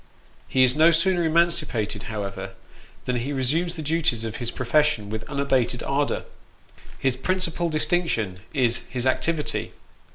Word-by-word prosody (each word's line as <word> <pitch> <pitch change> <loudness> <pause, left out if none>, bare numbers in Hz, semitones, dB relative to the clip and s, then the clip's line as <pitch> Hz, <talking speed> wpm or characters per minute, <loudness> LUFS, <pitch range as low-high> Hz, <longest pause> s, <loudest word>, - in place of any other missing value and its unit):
He 130 - +3
is 125 0 +4
no 160 +2 +6
sooner 175 +2 +2
emancipated, 155 -11 +1
however, 100 -3 -5 0.5
than 125 -1 0
he 125 +4 -3
resumes 160 +7 0
the 160 - -5
duties 150 -7 +1
of 110 0 -4
his 120 - -3
pro 130 - -5
fession 145 -5 +2
with 110 +1 -5
unabated 135 -4 0
ardour. 140 +1 0 0.7
His 130 -2 +1
principal 175 +3 -1
distinction 155 - 0
is 125 -6 +1
his 125 -1 -2
activity. 150 +4 0
135 Hz, 140 wpm, -24 LUFS, 120-165 Hz, 0.7 s, no